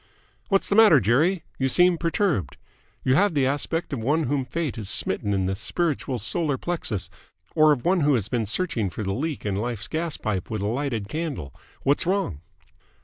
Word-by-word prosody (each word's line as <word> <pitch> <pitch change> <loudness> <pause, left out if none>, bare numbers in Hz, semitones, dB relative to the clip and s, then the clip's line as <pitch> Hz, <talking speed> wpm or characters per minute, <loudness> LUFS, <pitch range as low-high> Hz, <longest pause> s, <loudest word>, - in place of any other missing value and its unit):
"What's 195 -2 +2
the - - 0
matter, 210 -8 +7
Jerry? 155 - +2 0.2
You 135 0 +1
seem 175 +4 +4
perturbed. 165 - 0 0.5
You 130 - +3
have 190 +4 +3
the 140 -2 +3
aspect 145 +4 -1
of 135 - -2
one 150 +8 +1
whom 135 -1 -1
Fate 155 +1 -3
has 105 -4 -4
smitten 105 - 0
in 95 -2 +1
the 95 - 0
spiritual 135 - -2
solar 145 - -1
plexus, 125 - -3 0.5
or 155 0 +5
of 135 -5 0
one 180 +1 +3
who 145 -3 +3
has 105 -5 0
been 115 -3 -1
searching 115 - -1
for 100 +5 -5
the 95 -1 -2
leak 150 +3 -3
in 100 -2 -1
Life's 115 0 -3
gaspipe 150 - -2
with 110 -2 -3
a - - -1
lighted 120 -3 -2
candle. 140 - -4 0.3
What's 145 +4 +1
wrong?" 180 - -1
135 Hz, 190 wpm, -24 LUFS, 110-165 Hz, 0.5 s, matter